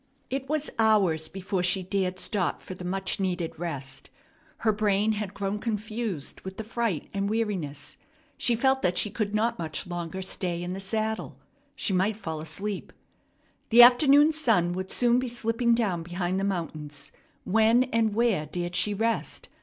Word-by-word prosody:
It 270 Hz, 0 st, -3 dB
was 305 Hz, 0 st, 0 dB
hours 195 Hz, -8 st, +3 dB
before 190 Hz, 0 st, -3 dB
she 180 Hz, +1 st, +2 dB
dared 185 Hz, -1 st, -1 dB
stop 195 Hz, -5 st, 0 dB
for -, -, -8 dB
the 180 Hz, -, -9 dB
much 190 Hz, +2 st, -2 dB
needed 175 Hz, -4 st, -2 dB
rest. 135 Hz, -5 st, -5 dB, 0.6 s
Her 220 Hz, -, +4 dB
brain 205 Hz, 0 st, +2 dB
had 210 Hz, -2 st, -4 dB
grown 200 Hz, +1 st, -2 dB
confused 215 Hz, -, -3 dB
with 190 Hz, 0 st, -8 dB
the 220 Hz, -, -4 dB
fright 225 Hz, -6 st, -2 dB
and 200 Hz, 0 st, -1 dB
weariness. 190 Hz, -11 st, -2 dB, 0.4 s
She 240 Hz, -, +2 dB
felt 265 Hz, +3 st, +2 dB
that 180 Hz, 0 st, +1 dB
she 210 Hz, -, +2 dB
could 210 Hz, 0 st, -2 dB
not 230 Hz, +2 st, +1 dB
much 160 Hz, +3 st, -4 dB
longer 175 Hz, +1 st, -5 dB
stay 175 Hz, -2 st, -2 dB
in 180 Hz, +1 st, -4 dB
the 190 Hz, -, -5 dB
saddle. 220 Hz, +3 st, -2 dB, 0.4 s
She 200 Hz, -, 0 dB
might 190 Hz, +4 st, +2 dB
fall 160 Hz, -7 st, -5 dB
asleep. 195 Hz, +6 st, -4 dB, 0.8 s
The 240 Hz, +1 st, +9 dB
afternoon 280 Hz, +5 st, +7 dB
sun 220 Hz, -, +2 dB
would 185 Hz, +1 st, -4 dB
soon 245 Hz, 0 st, +3 dB
be 255 Hz, -, -2 dB
slipping 235 Hz, 0 st, +1 dB
down 200 Hz, -8 st, 0 dB
behind 175 Hz, +2 st, -2 dB
the -, -, -2 dB
mountains. 155 Hz, -6 st, -4 dB, 0.3 s
When 225 Hz, +4 st, +4 dB
and 225 Hz, -2 st, +2 dB
where 220 Hz, -10 st, +1 dB
dared 175 Hz, +2 st, -4 dB
she 205 Hz, +3 st, +1 dB
rest? 225 Hz, +2 st, -2 dB
200 Hz, 170 wpm, -27 LUFS, 180-225 Hz, 0.8 s, The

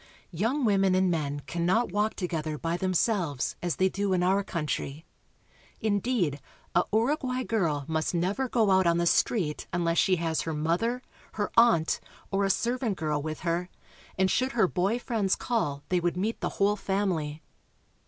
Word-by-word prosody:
Young 230 Hz, -, 0 dB
women 195 Hz, -3 st, +3 dB
and 185 Hz, -1 st, +3 dB
men 145 Hz, -3 st, -2 dB
can 170 Hz, +4 st, -4 dB
not 205 Hz, +5 st, +2 dB
walk 210 Hz, +3 st, 0 dB
together 160 Hz, -4 st, -3 dB
by 165 Hz, +2 st, -2 dB
themselves, 180 Hz, -, 0 dB
as 175 Hz, -2 st, -1 dB
they 190 Hz, -, +3 dB
do 195 Hz, 0 st, -1 dB
in 180 Hz, -1 st, +2 dB
our 195 Hz, +2 st, +2 dB
coun 170 Hz, -5 st, -3 dB
try. 145 Hz, +1 st, -3 dB, 0.8 s
Indeed, 200 Hz, -, 0 dB, 0.3 s
a 175 Hz, -, +4 dB
Uruguay 255 Hz, +3 st, +1 dB
girl 165 Hz, -, 0 dB
must 160 Hz, +2 st, -1 dB
never 200 Hz, +10 st, 0 dB
go 220 Hz, -5 st, +2 dB
out 190 Hz, -1 st, +4 dB
on 170 Hz, 0 st, +3 dB
the 170 Hz, -, +1 dB
street 170 Hz, -3 st, +1 dB
unless 170 Hz, -1 st, +1 dB
she 185 Hz, -, +4 dB
has 165 Hz, -2 st, -1 dB
her 160 Hz, -1 st, -3 dB
mother, 180 Hz, +12 st, 0 dB, 0.3 s
her 205 Hz, -1 st, -2 dB
aunt, 230 Hz, -9 st, +4 dB, 0.3 s
or 200 Hz, 0 st, +1 dB
a -, -, +1 dB
servant 235 Hz, 0 st, 0 dB
girl 150 Hz, -2 st, -1 dB
with 155 Hz, +1 st, -5 dB
her, 175 Hz, +1 st, -1 dB, 0.5 s
and 190 Hz, 0 st, +2 dB
should 255 Hz, +1 st, +1 dB
her 225 Hz, -5 st, +3 dB
boy 190 Hz, +6 st, 0 dB
friends 220 Hz, -6 st, 0 dB
call 145 Hz, -13 st, -2 dB
they 180 Hz, -, +2 dB
would 175 Hz, 0 st, -1 dB
meet 215 Hz, +5 st, -2 dB
the -, -, 0 dB
whole 200 Hz, +1 st, +3 dB
family. 175 Hz, -7 st, -2 dB
185 Hz, 175 wpm, -28 LUFS, 165-215 Hz, 0.8 s, a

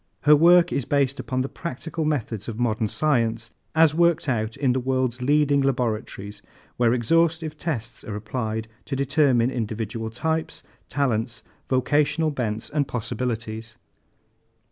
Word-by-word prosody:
Her 150 Hz, 0 st, +7 dB
work 170 Hz, +3 st, +6 dB
is 140 Hz, -, 0 dB
based 140 Hz, 0 st, +1 dB
upon 130 Hz, -1 st, -2 dB
the 130 Hz, -, -1 dB
practical 160 Hz, +1 st, -5 dB
methods 115 Hz, -8 st, -2 dB
of 115 Hz, -1 st, -5 dB
modern 110 Hz, -2 st, +1 dB
science 115 Hz, -4 st, 0 dB, 0.2 s
as 160 Hz, -1 st, +5 dB
worked 170 Hz, -1 st, +2 dB
out 110 Hz, -2 st, -1 dB
in 135 Hz, -3 st, +2 dB
the 130 Hz, -, 0 dB
world's 130 Hz, -1 st, -1 dB
leading 145 Hz, +1 st, +3 dB
laboratories 110 Hz, -6 st, -2 dB, 0.3 s
where 120 Hz, -2 st, +3 dB
exhaustive 160 Hz, +6 st, +1 dB
tests 120 Hz, -8 st, -4 dB
are 105 Hz, -, -5 dB
applied 110 Hz, +1 st, -3 dB, 0.2 s
to 140 Hz, -, -3 dB
determine 135 Hz, -3 st, +2 dB
individual 110 Hz, -1 st, -3 dB
types, 160 Hz, +8 st, -2 dB, 0.3 s
talents, 120 Hz, -4 st, -1 dB, 0.3 s
vocational 150 Hz, +4 st, +2 dB
bents 110 Hz, -6 st, -3 dB
and 145 Hz, -2 st, 0 dB
possibilities." 115 Hz, -2 st, -4 dB
130 Hz, 135 wpm, -24 LUFS, 115-150 Hz, 0.3 s, Her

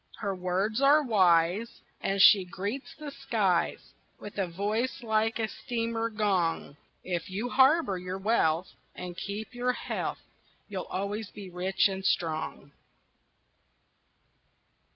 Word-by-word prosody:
Her 200 Hz, -3 st, -2 dB
words 190 Hz, +6 st, -1 dB
are 290 Hz, +2 st, +6 dB
wise, 190 Hz, -, +3 dB, 0.2 s
And 195 Hz, 0 st, -1 dB
she 195 Hz, 0 st, +8 dB
greets 200 Hz, +8 st, -5 dB
the 300 Hz, -2 st, -7 dB
skies 195 Hz, -10 st, 0 dB, 0.3 s
With 205 Hz, 0 st, -8 dB
a 190 Hz, -, +1 dB
voice 210 Hz, +9 st, -2 dB
like 220 Hz, 0 st, +1 dB
a 225 Hz, -1 st, 0 dB
steamer 230 Hz, -1 st, -2 dB
gong: 190 Hz, -9 st, 0 dB, 0.3 s
"If 175 Hz, -2 st, -3 dB
you 210 Hz, +6 st, -3 dB
harbor 265 Hz, -, +4 dB
your 180 Hz, +1 st, -5 dB
wealth 190 Hz, -5 st, +1 dB, 0.2 s
And 180 Hz, -1 st, -7 dB
keep 205 Hz, +6 st, -5 dB
your 250 Hz, +1 st, 0 dB
health, -, -, -3 dB, 0.5 s
You'll 195 Hz, -3 st, -5 dB
always 200 Hz, +2 st, -3 dB
be 200 Hz, -3 st, -10 dB
rich 185 Hz, +3 st, +2 dB
and 190 Hz, -1 st, -5 dB
strong." 160 Hz, -5 st, -1 dB
200 Hz, 125 wpm, -29 LUFS, 180-230 Hz, 0.5 s, she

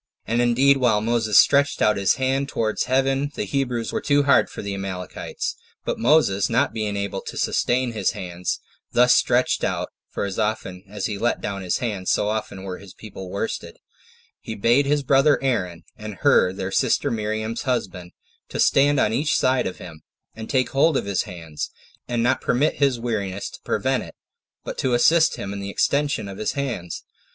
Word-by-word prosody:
And 115 Hz, +1 st, +1 dB
indeed 130 Hz, +4 st, +4 dB
while 120 Hz, -5 st, +3 dB
Moses 110 Hz, -1 st, +1 dB
stretched 140 Hz, 0 st, +5 dB
out 105 Hz, -, +3 dB
his 100 Hz, -1 st, +2 dB
hand 135 Hz, +1 st, 0 dB
towards 110 Hz, -4 st, -1 dB
heaven 135 Hz, +2 st, +1 dB
7 -, -, -27 dB
the -, -, -2 dB
Hebrews 125 Hz, -5 st, -2 dB
were -, -, -1 dB
too 145 Hz, 0 st, +3 dB
hard 140 Hz, -1 st, +4 dB
for -, -, -8 dB
the 100 Hz, 0 st, -3 dB
Amalekites: 95 Hz, -3 st, -5 dB, 0.3 s
but -, -, -2 dB
Moses 115 Hz, -7 st, +3 dB
not 130 Hz, +2 st, +1 dB
being 105 Hz, -2 st, -2 dB
able 100 Hz, -1 st, -3 dB
to -, -, -8 dB
sustain 125 Hz, 0 st, +1 dB
his 110 Hz, -, 0 dB
hands 90 Hz, 0 st, -4 dB, 0.3 s
thus 125 Hz, +1 st, +5 dB
stretched 125 Hz, 0 st, +2 dB
out, -, -, -1 dB, 0.2 s
[for -, -, -3 dB
as 100 Hz, -1 st, -4 dB
often 105 Hz, -4 st, -2 dB
as 105 Hz, -1 st, -4 dB
he 105 Hz, -3 st, -3 dB
let 120 Hz, -, 0 dB
down 100 Hz, -1 st, -4 dB
his 90 Hz, -2 st, -1 dB
hands, 105 Hz, -6 st, -3 dB
so 105 Hz, -, +2 dB
often 105 Hz, -3 st, -4 dB
were 95 Hz, -2 st, -6 dB
his 100 Hz, -3 st, -13 dB
own -, -, -38 dB
people 95 Hz, -3 st, -9 dB
worsted,] 225 Hz, -, -4 dB, 0.6 s
he 110 Hz, -, -7 dB
bade 120 Hz, +7 st, +3 dB
his 145 Hz, 0 st, +1 dB
brother 135 Hz, +2 st, +4 dB
Aaron, 90 Hz, -10 st, -1 dB
and 105 Hz, -1 st, -8 dB
Hur 90 Hz, -, +4 dB
their 95 Hz, 0 st, -4 dB
sister -, -, +1 dB
Miriam's 110 Hz, +1 st, -2 dB
husband, 95 Hz, -9 st, -3 dB, 0.4 s
to -, -, -5 dB
stand 140 Hz, +1 st, +4 dB
on 110 Hz, -, +2 dB
each 145 Hz, +6 st, +1 dB
side 130 Hz, 0 st, +2 dB
of 90 Hz, -, -6 dB
him, 80 Hz, -3 st, -11 dB, 0.3 s
and 110 Hz, 0 st, -8 dB
take 130 Hz, -2 st, +1 dB
hold 140 Hz, +2 st, +3 dB
of -, -, -2 dB
his 100 Hz, +3 st, -1 dB
hands, 80 Hz, -4 st, -6 dB, 0.4 s
and 120 Hz, -1 st, 0 dB
not 130 Hz, +2 st, +2 dB
permit 145 Hz, +5 st, +1 dB
his 135 Hz, -4 st, +2 dB
weariness 100 Hz, -5 st, -3 dB
to -, -, -11 dB
prevent -, -, 0 dB
it, -, -, -10 dB, 0.5 s
but -, -, -6 dB
to 125 Hz, -2 st, +1 dB
assist 160 Hz, +6 st, +4 dB
him 100 Hz, -, -5 dB
in 100 Hz, -, -5 dB
the 100 Hz, 0 st, -5 dB
extension 140 Hz, 0 st, 0 dB
of 95 Hz, -1 st, -8 dB
his 110 Hz, -, -1 dB
hands. 125 Hz, -11 st, -4 dB
115 Hz, 195 wpm, -23 LUFS, 100-130 Hz, 0.6 s, stretched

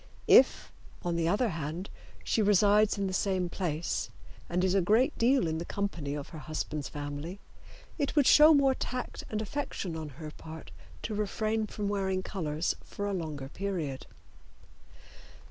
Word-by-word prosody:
If, -, -, +6 dB, 0.3 s
on 175 Hz, -1 st, -1 dB
the 165 Hz, -1 st, +1 dB
other 215 Hz, +7 st, +2 dB
hand, 165 Hz, +2 st, -5 dB, 0.3 s
she 225 Hz, -, +1 dB
resides 210 Hz, +1 st, +4 dB
in 200 Hz, -, 0 dB
the 190 Hz, -, -2 dB
same 185 Hz, -2 st, 0 dB
place 170 Hz, -3 st, -2 dB, 0.4 s
and 180 Hz, +1 st, 0 dB
is 185 Hz, -1 st, +2 dB
a 195 Hz, -, +4 dB
great 220 Hz, +8 st, +3 dB
deal 255 Hz, +1 st, +4 dB
in 160 Hz, 0 st, -1 dB
the -, -, -3 dB
company 170 Hz, -7 st, -3 dB
of 145 Hz, -2 st, -6 dB
her 160 Hz, -, -8 dB
husband's 150 Hz, -2 st, -4 dB
family, 145 Hz, +6 st, -6 dB, 0.6 s
it 285 Hz, +1 st, -1 dB
would 290 Hz, -3 st, +5 dB
show 305 Hz, +3 st, +8 dB
more 280 Hz, -3 st, +5 dB
tact 255 Hz, -1 st, -4 dB
and 215 Hz, 0 st, -2 dB
affection 205 Hz, -, -4 dB
on 160 Hz, -2 st, -5 dB
her 155 Hz, -2 st, -7 dB
part 160 Hz, +1 st, -10 dB, 0.3 s
to 215 Hz, -, -3 dB
refrain 215 Hz, +1 st, -1 dB
from 205 Hz, 0 st, -4 dB
wearing 190 Hz, -2 st, -1 dB
colors 160 Hz, -4 st, -2 dB
for 205 Hz, -, -5 dB
a 205 Hz, -, -1 dB
longer 155 Hz, -7 st, -4 dB
period. 165 Hz, -6 st, -4 dB
185 Hz, 165 wpm, -30 LUFS, 160-210 Hz, 0.6 s, show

